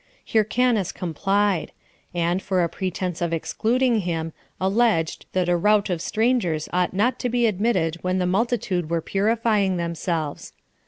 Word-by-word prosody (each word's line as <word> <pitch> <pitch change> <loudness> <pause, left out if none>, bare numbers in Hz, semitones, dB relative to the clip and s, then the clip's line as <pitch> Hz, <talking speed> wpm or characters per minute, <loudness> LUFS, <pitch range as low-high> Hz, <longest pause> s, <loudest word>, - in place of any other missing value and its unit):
Hyrcanus 220 -2 +2
complied; 195 +2 0 0.4
and, 175 +1 0
for 185 -2 +1
a 170 - 0
pretense 180 -2 -3
of 170 -1 0
excluding 235 +8 +1
him, 165 -4 -3 0.3
alleged, 190 -4 +1
that 185 -1 +1
a 175 - +3
rout 210 +2 +2
of 170 -2 -2
strangers 215 -9 0
ought 180 +1 +1
not 230 +6 +1
to 250 - -1
be 240 0 +2
admitted 200 -6 +1
when 185 0 0
the 180 - +1
multitude 190 -4 0
were 170 0 +1
purifying 210 -1 +1
themselves. 170 -3 -3
190 Hz, 145 wpm, -23 LUFS, 170-220 Hz, 0.4 s, a